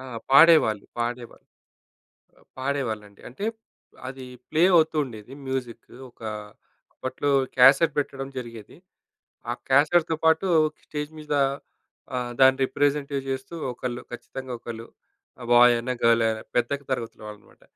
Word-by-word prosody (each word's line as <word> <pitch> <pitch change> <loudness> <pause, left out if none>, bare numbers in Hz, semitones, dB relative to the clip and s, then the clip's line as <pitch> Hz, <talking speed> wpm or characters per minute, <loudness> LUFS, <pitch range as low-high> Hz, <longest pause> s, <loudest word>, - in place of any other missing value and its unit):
ఆ! 130 - -10 0.3
పాడేవాళ్ళు. 140 -8 +6
పాడేవాళ్ళు. 120 0 -5 0.9
అ - - -25 0.2
పాడేవాళ్ళండి. 115 -7 -3
అంటే 130 +12 -7 0.6
అది 130 0 -8 0.3
ప్లే 155 +2 +2
అవుతూ 160 -1 +3
ఉండేది 110 0 -11
మ్యూజిక్. 130 -3 -4 0.2
ఒక - - -36 0.7
అప్పట్లో 130 +2 -3 0.3
క్యాసెట్ 135 +5 +6
పెట్టడం 135 -1 -3
జరిగేది. 115 -4 -9 0.7
ఆ - - +1 0.2
క్యాసెట్‌తో 160 +4 +3
పాటు 160 +4 +3 0.4
స్టేజ్ 150 0 -5
మీద 150 -1 -4 0.8
ఆహ్, 120 -1 -3
దాన్ని 130 0 +6
రిప్రజెంటే 145 +1 0
చేస్తూ, 135 +4 -5 0.2
ఒకళ్ళు 125 0 -5
ఖచ్చితంగా 130 +1 -8
ఒకళ్ళు 115 -1 -8 0.5
ఆహ్, 120 - -8
బాయ్ 120 0 +7
అయినా, 125 +2 -3
గర్ల్ 115 0 +4
అయినా 110 0 -2
పెద్దకి 140 +3 0
తరగతుల 115 -4 -4
వాళ్ళు 105 0 -10
మాట. - - -25
130 Hz, 125 wpm, -25 LUFS, 120-145 Hz, 0.9 s, బాయ్